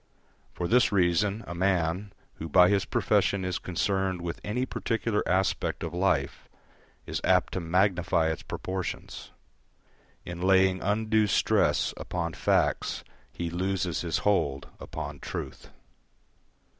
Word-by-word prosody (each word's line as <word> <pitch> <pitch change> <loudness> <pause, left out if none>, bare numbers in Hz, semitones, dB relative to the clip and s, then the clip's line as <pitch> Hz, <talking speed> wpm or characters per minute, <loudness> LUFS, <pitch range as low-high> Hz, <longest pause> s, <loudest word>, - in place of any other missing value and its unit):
For 90 - -2
this 125 +3 +4
reason 100 +3 +2
a 85 - -6
man, 90 +1 0 0.3
who 80 - -6
by 90 +3 +6
his 100 -2 +2
profession 95 -2 +1
is 90 -1 -2
concerned 95 +1 -1
with 85 0 -5
any 125 +5 -1
particular 115 -4 -1
aspect 95 +1 0
of 85 -1 -4
life, 95 +2 0 0.6
is - - -4
apt - - +3
to - - -1
magnify 90 -2 +2
its 80 - -5
proportions; 95 0 -5 1.0
in 85 0 -6
laying 95 0 +4
undue 110 +1 +2
stress - - +2
upon 85 -2 -3
facts - - 0 0.3
he 85 -1 -4
loses 90 0 -1
his 85 -2 -1
hold 70 -10 +1
upon - - -6
truth. - - -7
95 Hz, 125 wpm, -28 LUFS, 85-100 Hz, 1.0 s, by